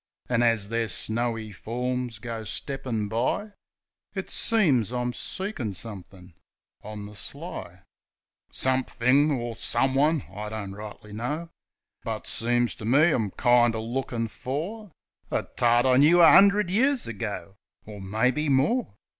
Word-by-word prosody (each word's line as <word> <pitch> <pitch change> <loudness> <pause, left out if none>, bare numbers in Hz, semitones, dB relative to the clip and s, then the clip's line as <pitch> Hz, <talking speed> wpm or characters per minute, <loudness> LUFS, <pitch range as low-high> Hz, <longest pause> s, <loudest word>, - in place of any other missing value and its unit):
An', 120 -1 +1
as 115 -4 +3
their 115 0 0
snowy 115 +1 -1
forms 125 +3 -3
goes 115 -2 -6
steppin' 130 -6 -3
by, 125 - -1 0.6
It - - -4
seems 145 - +2
I'm 125 0 -2
seekin' 175 - -4
somethin' 95 -3 -10 0.5
on 105 -1 -7
the 105 - -10
sly. 105 - -6
A - - -7
SPRING - - -22 0.7
SONG 130 0 0
15 - - -19
Somethin' 140 +5 +4
or 120 -3 -3
someone 135 +6 +2
— - - -18
I 105 +1 -5
don't 105 -3 -5
rightly 105 0 -10
know; 150 +10 -4 0.5
But, - - -4
seems 120 +1 +1
to 105 - -8
me, 145 +8 +5
I'm 110 -8 0
kind 120 +2 +3
er - - -2
lookin' 115 0 -3
for 165 - -5 0.4
A - - 0
tart 120 0 +2
I 130 -1 +4
knoo 155 +6 +6
a 170 - +8
'undred 200 -1 +5
years 260 +6 +2
ago, 100 -2 -5 0.3
Or, 105 -2 -9
maybe, 125 +10 0
more. 140 - +1
120 Hz, 150 wpm, -26 LUFS, 110-140 Hz, 0.7 s, a